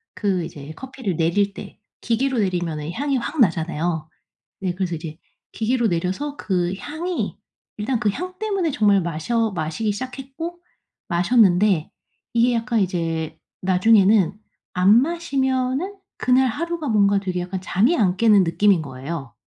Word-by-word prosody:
그 190 -4 0
이제 145 0 -9
커피를 255 -7 -5
내릴 195 +5 +1
때, - - -10 0.2
기계로 250 +2 0
내리면은 170 -5 -1
향이 275 +5 -1
확 285 +5 -4
나잖아요. 165 -4 +1 0.5
네 185 -2 -1
그래서 180 -2 -2
이제 160 0 -8 0.3
기계로 235 +1 +1
내려서 185 - -2
그 180 -2 -1
향이 340 - -3 0.4
일단 230 +3 -1
그 210 -3 +1
향 365 - -6
때문에 395 -6 0
정말 205 -5 +3
마셔 195 +8 -1
마시기 175 +5 -2
시작했고 270 +9 -6 0.5
마셨는데 185 -2 +3 0.4
이게 235 +1 +3
약간 230 0 0
이제 165 -4 -2 0.2
나중에는 195 +1 +4 0.4
안 195 +6 +5
마시면은 275 +1 -1 0.2
그날 255 +1 +3
하루가 330 +5 -3
뭔가 200 -2 +4
되게 185 -2 -3
약간 185 +1 -4
잠이 220 - +2
안 185 -5 +2
깨는 210 -2 +5
느낌인 180 +1 +3
거예요. 135 -1 -6
205 Hz, 300 characters per minute, -22 LUFS, 175-255 Hz, 0.5 s, 안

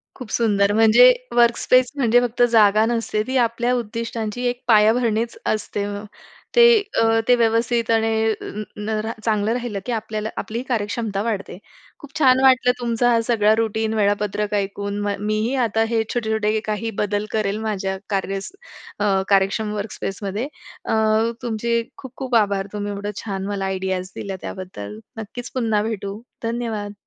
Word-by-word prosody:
खूप 250 -4 -9
सुंदर 205 -3 +2
म्हणजे 225 +3 +7 0.2
वर्कस्पेस 240 +1 +4
म्हणजे 245 -4 +4
फक्त 245 0 -2
जागा 215 -1 +5
नसते. 230 -2 -1
ती 260 0 0
आपल्या 235 +1 +1
उद्दिष्टांची 230 0 -4
एक 245 0 -5
पायाभरणीच 225 +1 +3
असते. 210 -1 -1 0.7
ते 480 - +7 0.4
अ, - - +4 0.2
ते 245 - +6
व्यवस्थित 230 0 +1
आणि 225 0 +2 0.3
अ - - -7
अ 210 +1 -5
न 215 +1 -2 0.2
चांगलं 215 -1 +1
राहिलं 240 -4 -3
की 250 - -3
आपल्याला 215 -1 -3
आपली 230 +2 -3
कार्यक्षमता 210 -2 -1
वाढते. 210 -6 -3 0.4
खूप 285 -1 -10
छान 260 -3 +5
वाटलं 255 -1 +5
तुमचा 240 0 +1
हा 230 - +4
सगळा 215 -3 +4
रुटीन 220 0 -1
वेळापत्रक 210 0 0
ऐकून. 200 0 -2
म 200 - 0
मी 215 0 0
ही 260 - -2
आता 225 0 +1
हे 230 -1 +1
छोटे-छोटे 220 -2 0
काही 215 +1 -2
बदल 205 0 -1
करेल 210 -2 0
माझ्या 190 -2 -2
कार्य 195 -1 -1 0.6
अ, 195 -2 +2
कार्यक्षम 200 +2 +2
वर्कस्पेसमध्ये. 205 +2 -4 0.4
अ, - - -1 0.5
तुमचे 235 0 -1
खूप, 260 -3 -10
खूप 260 -3 -2
आभार 200 -3 +2
तुम्ही 205 0 -3
एवढं 205 +1 -4
छान 195 -3 -4
मला 200 -1 -2
आयडियाज 190 -1 -2
दिल्या 195 -1 -5
त्याबद्दल. 110 - -7 0.2
नक्कीच 230 +3 -7
पुन्हा 225 -4 +1
भेटू. 210 -1 -4 0.2
धन्यवाद. 225 -3 -3
220 Hz, 150 wpm, -21 LUFS, 205-235 Hz, 0.7 s, म्हणजे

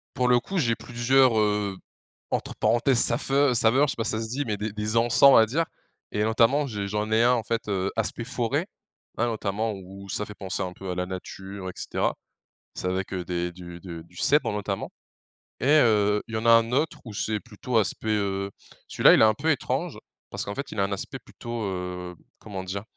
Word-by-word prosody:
Pour 125 0 +2
le 125 0 +5
coup, 190 +11 -3
j'ai 120 -8 +2
plusieurs, 120 +1 +3
heu, 105 -2 +1 0.5
entre - - -2
parenthèses 120 +1 +2
«saveu» 135 +3 +2
saveurs, 120 +5 +4
je - - 0
sais - - -9
pas 115 - -2
si - - 0
ça 110 - -1
se 110 - -5
dit, 135 +5 -2
mais 105 -5 -2
des 105 0 -4
des 105 +1 -2
encens 115 +2 +2
on 140 - +10
va 110 - +7
dire. 155 +9 0 0.5
Et 105 - +1
notamment 115 +6 +3
j'ai 105 -6 -4
j'en 105 +1 -2
ai 110 +1 +4
un 125 - +5
en 120 - 0
fait, 115 0 -2
heu, 95 -1 0
aspect 115 +1 -2
forêt. 130 +7 -1 0.5
Hein, 120 - +2
notamment 110 -1 -1
où 95 +1 -10
ça 105 +2 -2
fait 105 - -9
penser 95 -1 -4
un 90 -1 -3
peu 95 +1 -7
à - - -2
la 90 0 -2
nature 95 +1 -7
et - - -9
cetera. - - -1 0.6
C'est - - -3
avec, 95 +1 -2
heu, 90 -1 -2
des 90 0 -2
du 85 -1 -10
du 85 -2 -8
du 85 +2 -22
cèdre 150 - +3
notamment. 105 -1 -3 0.7
Et, - - -3
heu, 105 -8 +4
il 110 - -6
y - - +1
en 110 - -4
a 115 - +7
un 115 0 +5
autre 150 +5 0
où 110 - -8
c'est 105 +1 -1
plutôt 120 +2 -3
aspect, 110 +1 0
heu 100 -2 -1 0.4
celui-là - - +6
il - - +4
est - - +8
un 110 - +5
peu 155 +8 -1
étrange, 140 - -2 0.3
parce - - -3
qu'en 100 - -5
fait 140 0 -5
il 105 - -5
a - - +3
un 100 - -1
aspect 100 - -4
plutôt, 115 -1 -7
heu, 90 -1 -5 0.2
comment 100 -3 -6
dire? 95 +2 -5
110 Hz, 225 wpm, -26 LUFS, 95-120 Hz, 0.7 s, on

